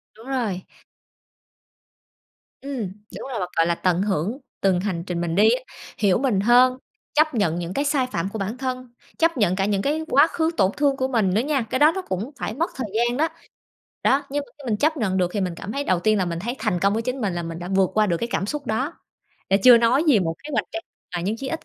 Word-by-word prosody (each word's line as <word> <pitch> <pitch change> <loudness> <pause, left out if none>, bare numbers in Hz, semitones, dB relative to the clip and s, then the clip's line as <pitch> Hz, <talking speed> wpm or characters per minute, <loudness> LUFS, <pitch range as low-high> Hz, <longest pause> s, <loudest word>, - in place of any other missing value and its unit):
Đúng 225 +3 -14
rồi. 230 -9 -2 2.0
Ừm, 275 -2 -5 0.4
đúng - - -7
rồi, 235 - -3
và, 180 - -2
gọi 165 - +4
là, 170 - +1
tận 180 +1 +1
hưởng 200 - -1 0.2
từng 190 -2 +3
hành 180 -4 -2
trình 175 -1 -2
mình 170 -1 -2
đi 210 +3 +6
á. 250 +2 +1 0.3
Hiểu 200 -4 +3
mình 245 -6 +1
hơn, 250 +4 +5 0.4
chấp 310 0 +3
nhận 175 -7 +1
những 175 +1 -4
cái 285 - 0
sai 280 -3 +1
phạm 170 0 -2
của 220 - -4
bản 205 +5 -3
thân, 255 -2 -4 0.2
chấp 330 -3 +2
nhận 190 -5 +2
cả 195 0 0
những 200 -1 0
cái 300 +5 0
quá 285 +3 +6
khứ 325 0 0
tổn 190 0 +3
thương 280 -2 +2
của 260 - 0
mình 220 -8 +1
nữa 215 - +3
nha. 280 0 0
Cái 230 +4 -2
đó 300 +2 +6
nó 380 - -2
cũng 215 - -4
phải 215 - -3
mất 325 +8 -1
thời 255 -5 -3
gian 240 +2 +1
đó. 315 - +2 0.8
Đó, 275 +2 +3
nhưng 290 +1 -2
mà - - -21
khi 265 -5 -5
mình 210 - +2
chấp 310 +8 +1
nhận 205 -8 0
được 180 -2 +1
thì 205 - -1
mình 180 -2 -1
cảm 200 - -7
thấy 285 +3 -2
đầu 185 -2 +1
tiên 215 +2 +2
là 185 - +1
mình 170 -1 -3
thấy 235 +8 -3
thành 215 -5 0
công 200 +2 +3
với 225 +2 -1
chính 250 +2 -3
mình, 200 -4 0
là 175 0 -3
mình 165 0 -6
đã 175 +1 -6
vượt 190 -1 +2
qua 215 0 +3
được 170 - +1
cái 235 - -3
cảm 185 - 0
xúc 285 +4 -4
đó. 255 +8 -1 0.6
Là 195 - +6
chưa 245 -2 +9
nói 245 +7 +3
gì 280 -9 +5
một 165 -2 -1
kế 300 - -6
hoạch 215 -5 +1
cho 335 - -2 0.4
mà 175 - -1
nhưng 205 +5 -1
chí 265 +3 -5
ít 325 - -4
220 Hz, 260 wpm, -23 LUFS, 190-270 Hz, 2.0 s, chưa